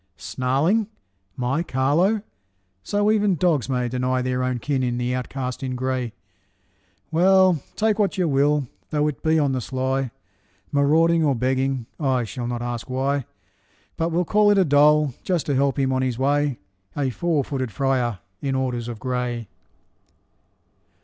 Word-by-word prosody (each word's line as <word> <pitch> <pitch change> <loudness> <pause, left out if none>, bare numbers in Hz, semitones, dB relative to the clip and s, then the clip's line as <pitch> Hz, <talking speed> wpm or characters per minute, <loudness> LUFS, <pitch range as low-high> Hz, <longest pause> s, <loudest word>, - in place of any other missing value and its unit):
snarling, 135 - 0 0.5
my 130 +5 0
Carlo! 170 +9 +1 0.6
So 205 - +1
even 205 -3 +2
dogs 155 -7 +1
may 125 -2 0
Deny 125 +1 -1
their 130 0 -1
own 125 -1 0
kin 135 +2 -1
in 120 -1 -1
the 125 0 -1
outcast 125 0 -4
in 130 -1 -3
gray. 130 -2 -2 1.0
Well, 185 -1 +4
take 220 0 +1
what 200 -3 +1
you 180 -2 +1
will, 145 -1 +2 0.2
though 150 -1 +1
it 150 - -4
be 160 0 +2
on 145 -3 +2
the 130 -1 -1
sly, 130 +1 -1 0.6
Marauding 160 +4 +3
or 140 -3 +2
begging, 130 0 0
I 130 -5 +1
shall 120 +2 -5
not 120 0 -3
ask 120 0 -4
why, 135 +1 0 0.7
But 165 +1 -1
will 175 +2 +1
call 210 +3 +4
it 205 - +4
a 190 - +4
dole, 150 -1 +4
just 180 -4 0
to 145 - 0
help 135 +1 +1
on 130 -1 +1
his 130 -3 -1
way 140 0 +1 0.4
A 135 -3 0
four 165 +1 0
footed 130 -3 -3
friar 125 -4 0 0.2
in 135 -1 -1
orders 125 -3 -2
of 120 -2 -5
gray! 125 -2 -3
135 Hz, 155 wpm, -23 LUFS, 125-155 Hz, 1.0 s, Well